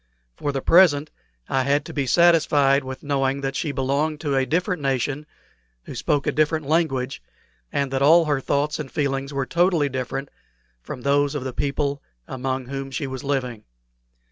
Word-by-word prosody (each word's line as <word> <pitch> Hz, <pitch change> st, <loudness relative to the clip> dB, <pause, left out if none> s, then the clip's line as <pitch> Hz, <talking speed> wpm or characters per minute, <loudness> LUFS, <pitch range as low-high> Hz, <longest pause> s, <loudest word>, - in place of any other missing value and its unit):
For 145 Hz, -, -2 dB
the 135 Hz, -1 st, -3 dB
present 155 Hz, -5 st, +5 dB, 0.4 s
I 135 Hz, -, +1 dB
had 140 Hz, +2 st, +1 dB
to -, -, -8 dB
be 140 Hz, -3 st, -1 dB
satisfied 145 Hz, -4 st, +4 dB
with 130 Hz, 0 st, -7 dB
knowing 140 Hz, -1 st, 0 dB
that 135 Hz, 0 st, -3 dB
she 150 Hz, +1 st, -1 dB
belonged 140 Hz, +3 st, -1 dB
to 145 Hz, -3 st, -1 dB
a 135 Hz, -1 st, +1 dB
different 180 Hz, 0 st, 0 dB
nation, 135 Hz, +2 st, -1 dB, 0.6 s
who -, -, -9 dB
spoke 145 Hz, -1 st, 0 dB
a -, -, +1 dB
different 155 Hz, 0 st, +1 dB
language, 135 Hz, -4 st, 0 dB, 0.5 s
and 140 Hz, -2 st, -1 dB
that 135 Hz, -, 0 dB
all 165 Hz, +4 st, +6 dB
her 145 Hz, -3 st, 0 dB
thoughts 145 Hz, +3 st, 0 dB
and 145 Hz, -3 st, -6 dB
feelings 135 Hz, -1 st, -1 dB
were 135 Hz, -1 st, -2 dB
totally 170 Hz, -2 st, +2 dB
different 135 Hz, +1 st, -4 dB, 0.5 s
from 125 Hz, -, -8 dB
those 140 Hz, +2 st, +1 dB
of 145 Hz, -, -3 dB
the 130 Hz, -1 st, -4 dB
people 140 Hz, +1 st, -1 dB, 0.3 s
among 130 Hz, 0 st, -3 dB
whom 135 Hz, +1 st, -5 dB
she 135 Hz, +2 st, -3 dB
was 130 Hz, +1 st, -6 dB
living. 130 Hz, -5 st, -2 dB
140 Hz, 175 wpm, -23 LUFS, 135-150 Hz, 0.6 s, all